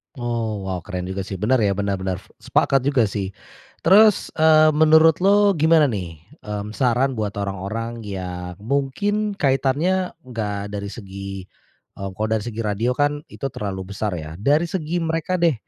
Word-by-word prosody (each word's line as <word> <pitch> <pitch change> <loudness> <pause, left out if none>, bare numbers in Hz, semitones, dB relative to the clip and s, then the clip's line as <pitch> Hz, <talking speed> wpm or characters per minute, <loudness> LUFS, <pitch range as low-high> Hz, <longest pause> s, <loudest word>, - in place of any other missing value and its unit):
Oh, 115 -5 -3
wow 95 -1 -3
keren 90 +1 -5
juga 95 +1 -4
sih 100 - -4
bener 110 +7 +2
ya, 100 -3 +2
bener 100 -1 -1
bener. 95 -1 -2 0.2
Sepakat 135 - +2
juga 135 -4 +3
sih. 100 -2 -3 0.5
Terus, 210 +3 +5
eee, 155 0 +6
menurut 160 +1 +5
lu 200 +2 +5
gimana 160 -1 +5
nih, 85 -6 -6 0.2
mmm, 105 0 -5
saran 125 +3 +1
buat 105 -2 -2
orang-orang 100 +4 -4
yang 90 -3 -6
mungkin 200 - -1
kaitannya 155 +5 +1
nggak 105 -5 -4
dari 100 -1 -4
segi, 100 -3 -7 0.6
eee, 100 - -4
kalau 110 +2 -1
dari 110 -2 +1
segi 115 -1 -4
radio 110 +4 0
kan 145 +1 +1
itu - - -14
terlalu 95 -3 -5
besar 100 -1 -2
ya, 80 +1 -7
dari 145 +9 +3
segi 170 -1 -2
mereka 165 +2 -1
deh 170 -2 +4
115 Hz, 160 wpm, -22 LUFS, 100-155 Hz, 0.6 s, eee